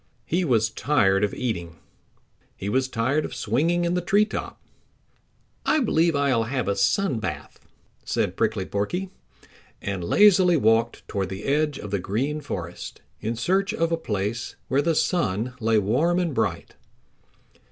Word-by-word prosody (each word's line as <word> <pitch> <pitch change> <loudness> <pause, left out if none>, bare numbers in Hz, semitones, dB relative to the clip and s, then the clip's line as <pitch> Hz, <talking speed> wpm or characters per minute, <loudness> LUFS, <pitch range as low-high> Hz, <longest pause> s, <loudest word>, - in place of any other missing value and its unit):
He 180 +3 0
was 115 -7 +2
tired 100 -7 +2
of 105 - +1
eating. 85 -9 -3 0.8
He 100 - -4
was 130 +4 +1
tired 130 +5 0
of 125 - -6
swinging 150 +10 +1
in 170 - 0
the 180 - 0
tree 205 +4 +3
top. 215 - -6 1.0
"I 310 - +2
believe 170 - +2
I'll 135 -5 +2
have 130 -1 -2
a 100 - +1
sun 140 - +1
bath," 75 -8 -6 0.4
said - - -1
Prickly 110 -4 0
Porky, 175 - -2 0.7
and 95 -3 -4
lazily 185 - +5
walked 115 -1 +1
toward 95 -2 -2
the 95 +2 -6
edge 150 0 +1
of 105 - -8
the 100 - 0
Green 135 +12 -2
Forest 90 - -7 0.2
in 115 +3 -3
search 195 - 0
of 165 -5 0
a - - +3
place 105 -6 -3
where 135 +2 +3
the 165 +2 +1
sun 125 - 0
lay 115 -1 +2
warm 130 - +2
and 175 -4 0
bright. 105 -8 -2
125 Hz, 155 wpm, -24 LUFS, 105-165 Hz, 1.0 s, lazily